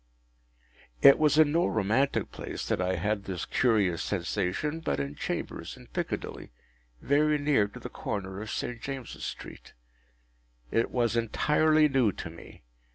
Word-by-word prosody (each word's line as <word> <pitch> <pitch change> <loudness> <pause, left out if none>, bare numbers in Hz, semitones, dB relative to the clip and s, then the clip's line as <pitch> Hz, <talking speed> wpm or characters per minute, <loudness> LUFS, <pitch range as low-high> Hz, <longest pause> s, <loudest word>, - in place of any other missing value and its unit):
It 140 - +9
was 150 -1 +3
in 155 -2 +6
no 170 +3 +2
romantic 110 +6 +1
place - - -6
that - - 0
I 90 +1 0
had 100 +3 -1
this 90 -3 -4
curious 105 -9 +2
sensation, 100 - -2
but 160 - -2
in 70 0 -3
chambers - - -5
in - - -14
Piccadilly, - - -4 0.5
very 150 +2 +3
near 145 -8 +2
to 100 - -11
the - - -6
corner 95 -1 -5
of 110 - -6
St. 120 +1 -4
James’s 135 -3 -6
Street. - - -8 1.0
It 115 - +1
was 120 -2 0
entirely 150 +7 +3
new 130 -7 +2
to 85 - -7
me. 85 - -14
115 Hz, 150 wpm, -28 LUFS, 95-145 Hz, 1.0 s, It